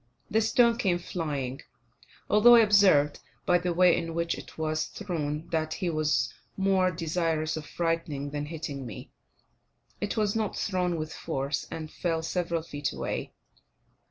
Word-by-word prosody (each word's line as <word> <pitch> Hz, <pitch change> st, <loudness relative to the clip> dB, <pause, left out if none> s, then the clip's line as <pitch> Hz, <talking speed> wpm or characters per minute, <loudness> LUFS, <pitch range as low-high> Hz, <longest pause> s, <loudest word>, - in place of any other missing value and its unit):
The 220 Hz, -, +3 dB
stone 235 Hz, +1 st, +3 dB
came 185 Hz, -7 st, +2 dB
flying, 145 Hz, -7 st, -4 dB, 0.7 s
although 235 Hz, +3 st, +7 dB
I 235 Hz, -, +8 dB
observed, 195 Hz, -9 st, +5 dB, 0.3 s
by 175 Hz, -1 st, +4 dB
the 180 Hz, 0 st, -1 dB
way 180 Hz, 0 st, +5 dB
in 165 Hz, -1 st, -3 dB
which 170 Hz, 0 st, 0 dB
it -, -, -11 dB
was 155 Hz, 0 st, -1 dB
thrown, 160 Hz, -5 st, -4 dB
that 160 Hz, -1 st, -1 dB
he 180 Hz, -4 st, -1 dB
was 150 Hz, -6 st, +1 dB, 0.2 s
more 190 Hz, -1 st, +3 dB
desirous 165 Hz, -2 st, -1 dB
of 155 Hz, -2 st, -6 dB
frightening 165 Hz, -4 st, -2 dB
than 145 Hz, 0 st, -3 dB
hitting 150 Hz, -5 st, -5 dB
me; 105 Hz, -, -9 dB, 0.9 s
it 205 Hz, +2 st, -3 dB
was 210 Hz, -1 st, +1 dB
not 220 Hz, -2 st, -1 dB
thrown 180 Hz, -3 st, 0 dB
with 155 Hz, 0 st, -4 dB
force, 140 Hz, -3 st, -3 dB
and 155 Hz, -1 st, -6 dB
fell 165 Hz, -2 st, -1 dB
several 170 Hz, -1 st, -1 dB
feet 145 Hz, -3 st, -3 dB
away. -, -, -4 dB
165 Hz, 155 wpm, -28 LUFS, 155-185 Hz, 0.9 s, I